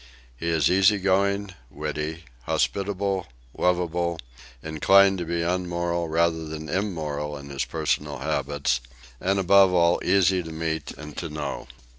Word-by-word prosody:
He 80 - -5
is 80 -3 +3
easy 95 +3 +5
going, 100 +1 +1 0.2
witty, 75 +3 -4 0.2
hospitable, 100 -2 -1 0.3
lovable, 85 -1 0 0.5
inclined 95 +5 +4
to 85 - -3
be 85 0 -1
unmoral 85 -1 -1
rather 80 0 +1
than 80 0 -6
immoral 75 -7 -2
in 70 0 -10
his 70 - -2
personal 75 -1 -2
habits, 70 -1 -1 0.4
and 95 +1 +1
above 95 0 +5
all 85 -1 +3
easy 95 -1 +3
to 80 -1 -8
meet 80 0 -3
and 75 -1 -9
to 85 - -4
know. 75 -1 -5
85 Hz, 135 wpm, -25 LUFS, 75-95 Hz, 0.5 s, easy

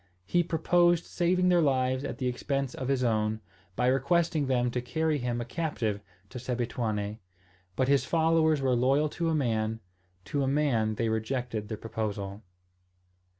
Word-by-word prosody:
He 175 - +2
proposed 175 +1 +2
saving 180 +1 +1
their 175 -1 +4
lives 130 -2 +1
at - - -4
the 130 - -3
expense 135 +1 -2
of 130 - -5
his 135 -2 +1
own, 110 -2 +1 0.4
by 125 - +1
requesting 150 +4 +2
them 125 -2 +1
to 125 - -2
carry 155 +4 0
him 120 -1 -2
a 120 - -3
captive 120 -8 -2 0.3
to 125 - -6
Sebituane! 115 -4 -2 0.6
But 130 - +1
his 140 0 +3
followers 160 -2 +2
were 130 -1 +2
loyal 135 +5 +2
to 165 +2 -2
a 160 - +1
man: 110 -5 0 0.5
to 140 +8 -1
a 135 - +1
man 130 -7 +1
they 115 - 0
rejected 110 -1 -2
the 110 - -5
proposal. 105 -2 -4
130 Hz, 160 wpm, -29 LUFS, 115-155 Hz, 0.6 s, their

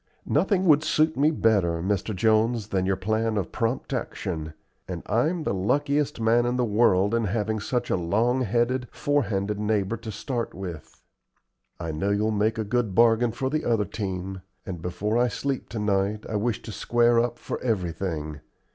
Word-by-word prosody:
"Nothing 190 +4 +2
would 155 -3 +5
suit 155 +1 +2
me 145 +3 +4
better, 100 - +2
Mr. 100 +3 -1
Jones, 110 +2 +2
than 95 -1 0
your 95 - +2
plan 110 +3 0
of 95 - -2
prompt 115 +4 -2
action, 80 -10 -4 0.3
and - - -5
I'm 155 - +1
the 150 - -1
luckiest 140 +9 0
man 115 +2 +3
in 120 - 0
the 125 -1 +1
world 105 -2 +3
in 115 -1 +1
having 110 +2 -1
such 120 +4 -2
a - - +3
long 110 +9 +1
headed, 120 +2 0
fore 145 -2 +1
handed 100 0 -2
neighbor 105 0 0
to 110 -1 -7
start 120 +3 -4
with. 90 -4 -8 0.8
I 85 -2 -3
know 80 +6 -1
you'll 105 +2 +1
make 110 +1 +1
a 110 - 0
good 110 -2 -1
bargain 115 0 +4
for 130 +3 -3
the 155 +1 0
other 115 -3 +1
team, 95 -2 -4 0.2
and 90 -4 -6
before 105 +6 -1
I 125 - +4
sleep 135 +2 -3
to 115 - -6
night 105 0 0
I 110 - -4
wish 110 +2 -1
to 110 - -7
square 120 +2 +3
up 120 0 0
for - - -5
everything. 85 - -2
110 Hz, 180 wpm, -26 LUFS, 95-120 Hz, 0.8 s, would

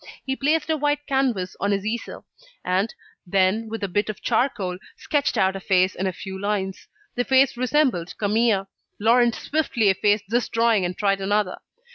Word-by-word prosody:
He 265 - -1
placed 300 +3 +1
a 315 - +1
white 290 0 0
canvas 255 -10 0
on 200 - 0
his 200 0 -1
easel; 230 +2 -4 0.4
and, 190 +4 +1 0.3
then, 195 +4 +1
with 225 -1 -5
a - - 0
bit 205 +3 -1
of 215 - -5
charcoal, 210 -7 -1 0.2
sketched 290 -2 0
out 190 0 +2
a - - -4
face 185 -1 +2
in 190 - -2
a - - 0
few 190 +1 -8
lines. 200 -2 -2 0.3
The 245 - 0
face 265 0 +3
resembled 255 - 0
Camille. 210 -1 +1 0.3
Laurent 235 +2 +4
swiftly 270 -8 0
effaced 205 +2 +2
this 240 +1 0
drawing 230 -4 +2
and 180 0 -4
tried 195 -1 +1
another. 205 -1 0
210 Hz, 175 wpm, -23 LUFS, 190-245 Hz, 0.4 s, Laurent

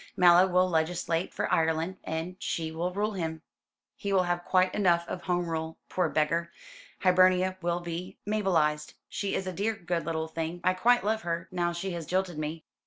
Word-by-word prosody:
"Mallow 180 +1 +7
will 185 0 +3
legislate 165 0 0
for - - -2
Ireland, 160 +3 +1
and 160 +3 -4
she 160 -1 -2
will 170 +3 -2
rule 205 +3 -1
him. 160 -4 -4 0.5
He 200 - -4
will 190 -2 +4
have 175 0 -1
quite 185 0 +2
enough 175 -4 +2
of 180 - -5
Home 175 -1 0
Rule, 160 0 -3
poor 180 -3 +1
beggar. 165 +3 0 0.5
Hibernia 185 0 +4
will 175 0 -1
be 175 +2 -6
Mabelised. 170 -8 +1
She 200 -1 -2
is 190 - -2
a 185 - -3
dear 210 +5 -1
good 175 -3 -2
little 160 -1 -1
thing. 165 +2 -4
I 185 - +3
quite 240 +6 +3
love 220 +2 0
her, 170 -2 -3
now 175 -1 0
she 175 +3 -4
has 170 -3 -5
jilted 185 -3 -1
me." 155 +1 -4
175 Hz, 185 wpm, -29 LUFS, 165-185 Hz, 0.5 s, Mallow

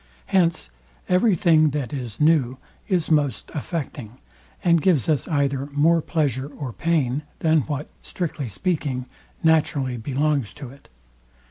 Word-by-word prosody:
Hence 170 - +1 0.4
every 185 +3 +3
thing, 155 -2 +4
that 130 -4 -4
is 120 -6 -5
new, 150 -5 +3 0.3
is 180 -5 0
most 145 -4 +1
affecting, 140 - -5 0.5
and 170 -3 +4
gives 155 - +2
us 150 -5 +1
either 140 -3 0
more 155 +4 +3
pleasure 140 -5 -1
or 140 -4 -7
pain, 150 -4 0 0.2
than 160 -1 +3
what, 145 0 -3
strictly 155 -7 -4
speaking, 140 - -2 0.4
naturally 145 -5 +2
belongs 140 0 -1
to 135 -4 -9
it. 140 - -18
145 Hz, 130 wpm, -23 LUFS, 130-165 Hz, 0.5 s, thing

